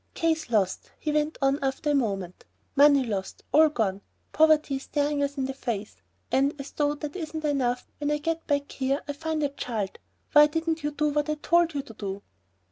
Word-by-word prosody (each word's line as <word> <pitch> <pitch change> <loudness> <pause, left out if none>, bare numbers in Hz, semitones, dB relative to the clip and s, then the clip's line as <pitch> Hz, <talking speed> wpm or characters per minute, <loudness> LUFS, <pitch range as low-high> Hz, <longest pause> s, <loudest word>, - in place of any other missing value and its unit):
"Case 320 -4 0
lost," 200 -5 0
he 305 - -2
went 300 +1 0
on 275 +1 +3
after 270 +2 0
a - - +2
moment; 195 -9 -1 0.3
"money 285 -1 +6
lost, 195 -4 -4
all 315 +1 +6
gone, 200 -8 -1 0.3
poverty 305 -3 +4
staring 290 +1 -1
us 280 0 -1
in 265 - 0
the 270 - -3
face. 220 - -4 0.3
And 275 +2 +2
as 275 - -7
though 290 0 0
that 295 +1 -6
isn't 315 -3 -4
enough, 250 -4 0
when 295 0 -1
I 295 - +2
get 330 +2 -3
back 285 -1 0
here, 275 +2 -1
I 290 - -2
find 315 +1 -2
a 285 - +2
child. 225 -8 -4 0.3
Why 295 0 +8
didn't 325 +1 -1
you 295 - +1
do 295 +1 0
what 295 +1 0
I 305 - +1
told 335 +1 +2
you 280 - -1
to 225 - -12
do?" 200 -2 -5
285 Hz, 205 wpm, -27 LUFS, 260-300 Hz, 0.3 s, Why